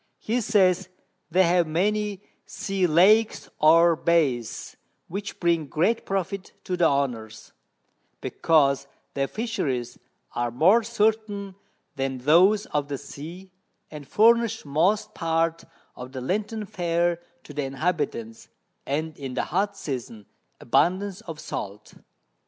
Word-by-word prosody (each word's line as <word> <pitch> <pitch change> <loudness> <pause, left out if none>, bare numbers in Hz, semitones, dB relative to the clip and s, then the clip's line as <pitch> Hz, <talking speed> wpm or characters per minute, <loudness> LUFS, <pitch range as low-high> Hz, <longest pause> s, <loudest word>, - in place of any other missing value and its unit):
He 240 +3 -1
says, 190 -4 +2 0.4
they 185 +3 +4
have 175 -1 +3
many 205 +4 -1 0.2
Sea 195 -2 -1
Lakes 205 +7 +4
or 165 +2 +6
Bays, 150 -9 0 0.3
which 200 +3 -6
bring 170 -3 +1
great 180 +11 0
Profit 195 0 -3
to 185 - -2
the 175 -2 +4
Owners, 120 -7 -2 0.7
because 140 -4 +2 0.3
their 135 -1 0
Fisheries 135 - -3 0.3
are 120 0 -1
more 175 - +4
certain 215 -3 -1 0.4
than 135 -1 -2
those 180 +11 +4
of 145 -1 -2
the 140 -1 -3
Sea; 165 +7 -10 0.4
and 150 -2 -9
furnish 230 -1 +3
most 170 +9 +1
part 165 0 -1 0.3
of 125 +1 -9
the 130 - -4
Lenten 210 - -2
Fair 175 -2 0 0.2
to 145 - -11
the 145 - -2
Inhabitants, 135 -6 -3 0.4
and 155 +3 -2
in 135 -2 -6
the - - 0
hot 200 +2 0
Season 120 -6 -6 0.3
abundance 185 - +1
of 165 -8 -8
Salt. 105 -5 -7
170 Hz, 125 wpm, -25 LUFS, 140-200 Hz, 0.7 s, or